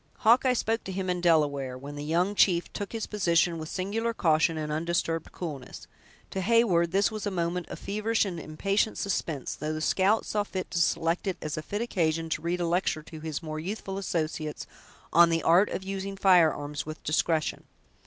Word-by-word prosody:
Hawkeye 250 +3 +5
spoke 225 -1 -1
to 190 - -4
him 185 -1 -2
in 180 0 -2
Delaware, 145 -6 +2
when 140 +3 -8
the 145 - -5
young 175 +6 +1
chief 175 -4 +3
took 205 - -5
his 225 -2 -3
position 170 -4 +1
with 155 0 -6
singular 225 +5 -2
caution 160 -2 +2
and 155 -1 -3
undisturbed 165 0 -1
coolness. 145 -8 -7 0.5
To 190 - -2
Heyward 190 -5 +3
this 200 +4 +2
was 215 -1 -4
a - - +1
moment 175 -1 -2
of - - -6
feverish 215 +2 0
and 180 -4 -4
impatient 195 +8 -1
suspense; 160 -8 -2
though 155 +1 -4
the 155 - -3
scout 195 +7 +2
saw 210 -1 0
fit 190 -2 -5
to 170 - 0
select 165 +3 +1
it 190 - -1
as 155 -1 -4
a 155 - -3
fit 205 +8 -3
occasion 165 -7 0
to 155 - -2
read 170 +2 -1
a - - +1
lecture 170 -2 0
to 160 0 -10
his 155 0 -5
more 155 -1 -4
youthful 195 +2 -4
associates 155 -4 -3 0.5
on 170 +1 +7
the 165 0 0
art 175 +5 +5
of 190 - -4
using 195 0 -4
firearms 160 -7 +3
with 155 0 -8
discretion. 155 0 0
170 Hz, 195 wpm, -28 LUFS, 155-195 Hz, 0.5 s, on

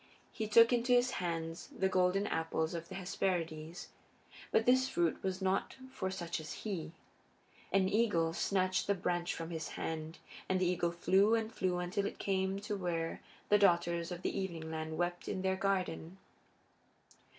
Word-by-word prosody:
He 220 -2 -3
took 230 +3 +7
into 245 +1 +2
his 245 +1 +4
hands 165 -1 -3
the 190 - +2
golden 185 +1 +2
apples 160 -2 -1
of 170 -1 -5
the - - -7
Hesperides. 175 -3 -2 0.6
But 225 - +3
this 260 +1 +4
fruit 170 -7 0
was 190 0 -2
not 190 +1 0 0.2
for 190 -8 -3
such 175 -3 -3
as 155 -1 -6
he. 180 -6 -3 0.8
An 195 -1 +3
eagle 190 -6 +2
snatched 185 +1 +1
the 200 - +3
branch 175 -1 -1
from 165 +1 -5
his 160 -1 -3
hand, 160 +1 -4 0.3
and 185 - +2
the 185 - +2
eagle 175 -1 +1
flew 190 +5 +4
and 225 0 -2
flew 185 -4 0
until 185 +3 -1
it - - -6
came 190 0 0
to 210 0 -3
where 170 -4 -2 0.3
the 210 - +6
Daughters 170 -2 +3
of 175 0 -6
the - - -1
Evening 170 -5 -3
Land 160 0 -4
wept 175 +1 -2
in 190 - -2
their 190 0 +2
garden. 190 -3 -1
180 Hz, 170 wpm, -34 LUFS, 170-195 Hz, 0.8 s, took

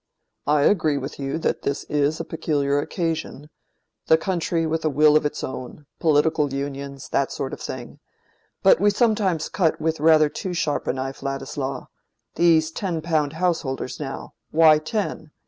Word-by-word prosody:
I 145 0 +3
agree 155 -6 +3
with 140 +2 -6
you 135 +2 -2
that 165 - -1
this 140 0 -2
is 150 +1 0
a - - -4
peculiar 145 -3 0
occasion—the 160 -1 -3
country 170 -1 -1
with 160 0 -1
a 155 - +2
will 150 +1 +4
of 155 -1 +4
its - - -7
own—political 145 +3 -1
unions—that 140 0 -3
sort 135 -1 -4
of - - -7
thing—but - - -2
we 205 - +5
sometimes 205 -7 +1
cut 170 -5 0
with 160 0 -1
rather 155 0 +5
too 180 +4 -5
sharp 150 -3 -1
a - - +1
knife, 135 +1 -5
Ladislaw. 135 0 -4 0.5
These 160 -2 +3
ten 170 -3 -3
pound 155 -4 0
householders, 160 -7 -2
now: 135 -2 -6 0.2
why 155 -1 +6
ten? 160 -2 -3
155 Hz, 145 wpm, -23 LUFS, 140-165 Hz, 0.5 s, why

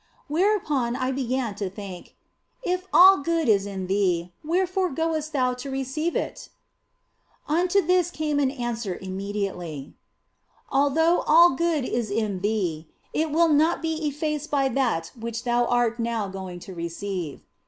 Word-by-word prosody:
Whereupon 305 - +1
I 255 0 -1
began 255 -3 -1
to 195 -1 -4
think, 195 -2 -9 0.2
" - - -49 0.2
If 365 -2 -2
all 380 +2 +8
good 330 +1 0
is 200 -2 +3
in 190 -2 -4
thee, 180 -3 0
wherefore 365 +3 +1
goest 315 +1 -2
thou 255 -4 +1
to 250 +2 -7
receive 270 +5 -2
it? - - -4 0.5
" - - -41
Unto 355 +5 +2
this 360 0 +3
came 305 -3 -1
an 275 -2 +2
answer 240 -7 -3
immediately, 190 -6 -4 0.4
" - - -48 0.3
Although 305 +5 +3
all 335 +3 +7
good 315 -1 0
is 235 -4 -2
in 205 -2 -1
thee, 180 -6 -1 0.3
it 315 0 0
will 330 +2 +3
not 315 +3 +3
be 320 -1 -1
effaced 300 +1 -3
by 275 -2 +2
that 230 -11 0
which 230 0 -4
thou 240 -1 +2
art 240 -1 +1
now 230 -3 -1
going 190 -2 -7
to 190 - -9
receive." 170 -1 -5
255 Hz, 155 wpm, -25 LUFS, 200-315 Hz, 0.5 s, all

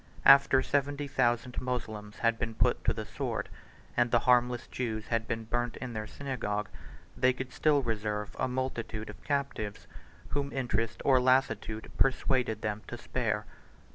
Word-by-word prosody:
After 135 -1 +7
seventy 145 0 0
thousand 120 -1 +1
Moslems 110 -5 -4
had 115 -1 +1
been 115 -1 -3
put - - +2
to - - +4
the - - -4
sword, - - -3 0.5
and 120 0 +3
the 120 0 +3
harmless 125 -1 +3
Jews 110 -3 -4
had 115 -1 0
been 115 0 -2
burnt 120 +1 -2
in 125 -2 -5
their 110 -1 -4
synagogue, 105 -7 -3 0.5
they 130 0 +3
could 130 0 -6
still 145 -3 +3
reserve 105 -2 -2
a 130 - +1
multitude 120 -4 -3
of 105 - -17
captives, 140 -8 -2 0.4
whom 140 -1 -1
interest 115 -4 -1
or 130 -2 +6
lassitude 115 -4 +1
persuaded 125 -4 +2
them 105 -1 -2
to - - -6
spare. - - -1
120 Hz, 155 wpm, -30 LUFS, 110-130 Hz, 0.5 s, After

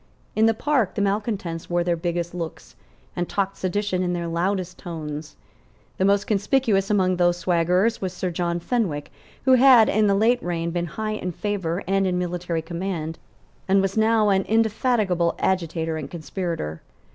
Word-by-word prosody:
In 220 +1 +4
the 225 - +2
Park 265 -5 +1
the 205 - -1
malecontents 200 -5 -2
wore 175 0 +1
their 175 0 +1
biggest 170 0 -3
looks, 170 -2 -7 0.4
and 175 0 -2
talked 195 -1 -1
sedition 190 0 -1
in 180 -1 0
their 170 -1 -2
loudest 180 +2 -2
tones. 155 -2 -6 0.6
The 190 - +3
most 200 +1 +3
conspicuous 205 -1 +1
among 185 -3 +2
these 175 0 +3
swaggerers 180 +5 +1
was 190 -2 -2
Sir 180 0 -3
John 170 0 -1
Fenwick, 170 - -2 0.3
who 260 - +6
had, 255 -3 +7
in 215 0 +3
the 200 - +3
late 235 +4 +3
reign, 170 -1 -2
been 175 0 -2
high 215 +6 -4
in 185 -4 -3
favour 190 -3 -2
and 195 +1 +1
in 180 -1 0
military 175 -2 -2
command, 170 -2 -4 0.5
and 195 +1 +4
was 195 0 0
now 220 -1 +3
an 190 -1 +3
indefatigable 215 -5 +1
agitator 165 -3 -1
and - - -6
conspirator. 165 - -4
185 Hz, 170 wpm, -24 LUFS, 170-205 Hz, 0.6 s, had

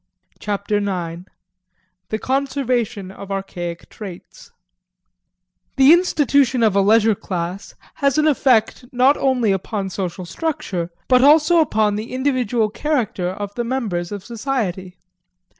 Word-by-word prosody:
Chapter 205 0 -1
Nine 180 -3 -4 0.4
~~ 185 0 -48
The 215 - -1
Conservation 250 -6 -1
of 200 0 -10
Archaic 175 -3 -5
Traits 190 -5 -11 1.3
The 270 +3 +7
institution 280 -8 +2
of 215 -3 +3
a 200 - +4
leisure 220 +2 +4
class 180 0 -5 0.2
has 280 -2 +1
an 305 - +3
effect 255 -5 +2
not 260 +3 +4
only 250 -6 +1
upon 195 0 -3
social 185 -1 -4
structure 195 - -3 0.2
but 255 0 +4
also 310 +4 +5
upon 215 -9 +2
the 220 +4 -6
individual 250 -5 0
character 235 -8 -1
of 200 +2 -6
the 240 - -2
members 215 -9 -3
of 200 -2 -6
society. 215 -7 -3
215 Hz, 125 wpm, -20 LUFS, 190-265 Hz, 1.3 s, The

